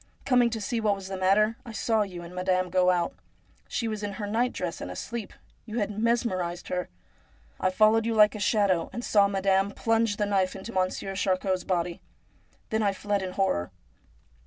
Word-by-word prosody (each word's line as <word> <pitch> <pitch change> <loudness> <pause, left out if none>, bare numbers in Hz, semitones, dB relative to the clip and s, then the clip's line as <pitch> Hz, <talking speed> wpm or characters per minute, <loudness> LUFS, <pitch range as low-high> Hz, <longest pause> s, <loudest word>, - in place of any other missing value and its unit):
Coming 245 -3 +4
to 225 -1 -3
see 230 +1 -2
what 210 -2 +2
was 195 -1 -8
the 195 - -3
matter, 205 +4 +3
I 230 - -9
saw 220 0 +1
you 180 -4 -4
and 170 +1 -10
madaine 185 0 0
go 185 0 +4
out. 175 -2 +1 0.5
She 230 - -2
was 215 -2 -3
in 205 -1 -3
her 205 +2 -4
nightdress 205 -5 -1
and - - -5
asleep. 230 -3 -5 0.4
You 220 +1 -5
had 210 -2 0
mesmerised 205 -6 -1
her. 180 0 -2 0.7
I 185 - +2
followed 215 +4 +4
you 230 - 0
like 210 -1 +6
a 210 - -6
shadow, 200 -5 +2
and 240 - -4
saw 200 -2 +4
madame 195 0 +2
plunge 225 0 +1
the 210 - +1
knife 195 -2 +1
into 195 +4 -8
Monsieur 185 +1 -1
Charcot's 185 -1 0
body. 175 -2 -1 0.7
Then 220 0 +1
I 200 -2 +2
fled 205 +1 -1
in 185 -1 -4
horror.' 135 - 0
200 Hz, 190 wpm, -27 LUFS, 185-220 Hz, 0.7 s, like